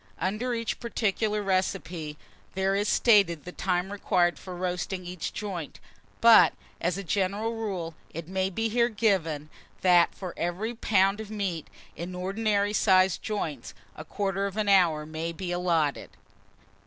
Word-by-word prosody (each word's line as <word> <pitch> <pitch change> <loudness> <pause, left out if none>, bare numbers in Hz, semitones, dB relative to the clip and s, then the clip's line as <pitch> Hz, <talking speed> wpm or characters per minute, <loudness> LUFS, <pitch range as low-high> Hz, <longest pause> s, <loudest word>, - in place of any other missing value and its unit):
UNDER 225 +6 -1
EACH 230 -1 -3
PARTICULAR 215 -2 -1
RECIPE 180 -5 -2 0.4
there 190 +1 +1
is 205 +1 0
stated 195 - +4
the 180 - -6
time 180 +1 -1
required 180 -4 +1
for 185 -1 -8
roasting 180 +1 -3
each 180 -1 -5
joint; 185 -7 -6 0.4
but, 225 -7 +8 0.3
as 180 +2 0
a 200 - -4
general 200 +5 -1
rule, 190 -7 -4 0.2
it 165 0 -7
may 190 +1 0
be 225 +4 -1
here 235 +2 +2
given, 185 -9 0 0.3
that 175 -2 +5
for 185 -3 -6
every 185 +7 -2
pound 200 -3 +2
of 220 -2 -7
meat, 195 -7 -3 0.3
in 175 +3 -6
ordinary 200 +2 0
sized 190 -3 +4
joints, 160 - -4 0.2
a 155 - -8
quarter 195 +2 -2
of 200 +1 -7
an 215 -1 0
hour 170 -6 +4
may 160 +2 -4
be 175 +2 -5
allotted. 170 -5 0
190 Hz, 150 wpm, -27 LUFS, 175-210 Hz, 0.4 s, but